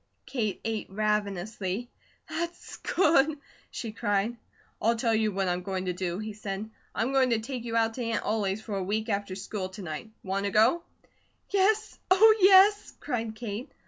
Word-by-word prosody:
Kate 235 -7 -2
ate 220 -2 -2
ravenously. 210 +1 -2 0.4
"That's 340 +1 -5
good!" 310 -4 +3 0.3
she 230 -4 -5
cried. 210 +1 0 0.5
"I'll 230 +2 +3
tell 230 0 +1
you 220 -1 +2
what 195 -1 -1
I'm 180 0 0
going 190 0 -3
to 180 - -1
do," 180 -1 -3
he 215 +1 -5
said. 205 0 -5 0.3
"I'm 250 +4 0
going 265 -1 +4
to 230 -2 +2
take 240 +1 -5
you 230 -1 -3
out 225 0 +2
to 245 - -4
Aunt 230 -1 -1
Ollie's 210 -1 -1
for 210 - -4
a 190 - -1
week 215 +4 -1
after 200 -2 -2
school 190 -1 -4
to 190 +1 -9
night. 160 +5 -6
Want 195 +1 -1
to - - +1
go?" 225 - +4 0.7
"Yes! 415 +2 +2
Oh, 430 +4 +7
yes!" 395 +2 +6
cried 230 -5 -3
Kate. 225 +2 -5
220 Hz, 175 wpm, -28 LUFS, 200-250 Hz, 0.7 s, Oh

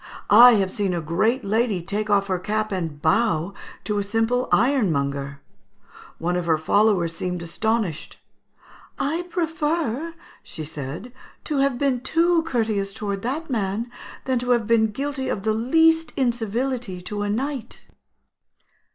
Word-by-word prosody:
I 240 +4 +10
have 195 -3 +1
seen 195 -3 -1
a - - -1
great 195 - 0
lady 215 -3 0
take 210 +3 -3
off 200 -1 +3
her 185 -2 -1
cap 215 +3 -2
and 165 -6 -3
bow 170 +1 +1 0.3
to 210 -1 -1
a - - 0
simple 225 +4 0
ironmonger. 140 - +1 0.8
One 175 +2 -1
of 175 -1 -2
her 160 -1 +3
followers 175 0 +2
seemed 180 0 -3
astonished. 205 -1 -2 0.8
'I 325 +5 -1
prefer,' 325 -3 -1 0.3
she 155 - -8
said, 155 - -7 0.3
'to 300 - -2
have 275 -2 +2
been 270 -2 +1
too 335 +4 +2
courteous 215 -7 -1
towards 200 -1 -4
that 280 +7 -3
man, 220 +1 -2 0.3
than 260 -2 +1
to 250 +1 -4
have 240 -3 +3
been 225 0 +3
guilty 270 +4 -3
of 195 - -3
the 220 0 +1
least 320 +8 +3
incivility 240 -3 -1
to 205 +3 -5
a 205 - -1
knight.'" 260 +4 -4
220 Hz, 145 wpm, -23 LUFS, 185-255 Hz, 0.8 s, I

